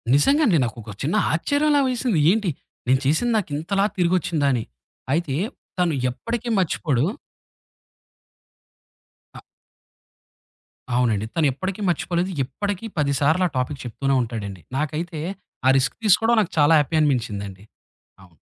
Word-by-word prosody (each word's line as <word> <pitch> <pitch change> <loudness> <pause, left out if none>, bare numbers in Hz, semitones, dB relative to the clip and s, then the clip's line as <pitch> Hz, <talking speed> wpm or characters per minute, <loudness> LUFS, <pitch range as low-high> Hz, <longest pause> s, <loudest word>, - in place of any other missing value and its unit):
నిజంగా 275 - +4
అండి. 185 -8 +4
నాకొక 115 -2 -7
చిన్న 155 +9 0 0.2
ఆశ్చర్యంలా 290 - +2
వేసింది. 245 -7 0
ఏంటి 210 -3 +1 0.4
నేను 130 +1 +4
చేసింది 195 - +2
నాకింతలా 190 +3 -1
తిరిగొచ్చిందా 170 -4 +1
అని. 120 -3 -1 0.5
అయితే 150 -4 0 0.4
తను 175 -3 +2 0.2
ఎప్పటికి 235 - -4
మర్చిపోడు. 150 -7 0 2.3
అ - - -8 1.6
అవునండి. 110 -4 +1
తనెప్పటికి 165 +7 -1
మర్చిపోలేదు. 175 +2 -1
ఇప్పటికి 200 - -4
10 140 -1 +1
సార్లా 160 +6 +3
టాపిక్ 130 +3 -2
చెప్తూనే 135 +3 -1
ఉంటాడండి. 100 -6 -5 0.2
నాకైతే 155 +3 -3 0.5
ఆ - - +7
రిస్క్ 130 -1 0
తీసుకోవడం 225 +4 +4
నాకు 200 - -3
చాలా 145 +3 +5
హ్యాపీ 150 +2 -1
అనిపించిందండి. 105 -9 -1 0.6
అవును. 85 -4 -20
155 Hz, 115 wpm, -23 LUFS, 130-190 Hz, 2.3 s, ఆ